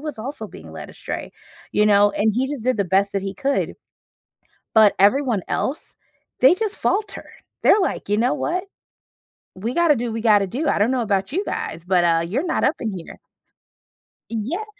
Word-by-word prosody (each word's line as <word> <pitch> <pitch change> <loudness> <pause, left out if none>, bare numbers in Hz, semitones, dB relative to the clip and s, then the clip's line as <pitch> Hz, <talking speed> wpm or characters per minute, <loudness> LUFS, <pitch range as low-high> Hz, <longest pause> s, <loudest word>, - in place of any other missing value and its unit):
was 300 -4 -6
also 265 +7 -6
being - - -12
led - - -8
astray, - - -7 0.4
you 210 - +3
know, 205 0 +5
and 215 +1 +1
he 255 +3 +1
just 285 -5 -5
did 255 -2 +1
the 200 - +2
best 195 +2 +1
that 195 - -1
he 195 0 -4
could. 275 +5 -1 1.0
But 215 -2 +7
everyone 230 +1 +3
else, 280 - -3 0.5
they 265 +6 +7
just 430 +1 -2
falter. 410 -1 -1 0.4
They're, 430 - +6
like, 370 - -2
you 205 - +2
know 245 +3 +2
what? 360 +3 -2 0.9
We 220 +6 -4
gotta 340 -2 +4
do 245 -1 -3
what 225 - -4
we 225 - -3
gotta 210 -3 +4
do. 280 - -3
I - - +2
don't 215 +5 +3
know 260 -2 0
about 200 -1 -1
you 375 +7 -1
guys, 165 +2 -5
but, 180 -1 +2
uh, 165 -1 +3
you're 255 - -1
not 345 - -1
up 295 - +2
in 220 - -2
here. 170 - -10 1.1
Yeah. 235 - -3
230 Hz, 195 wpm, -22 LUFS, 200-290 Hz, 1.1 s, But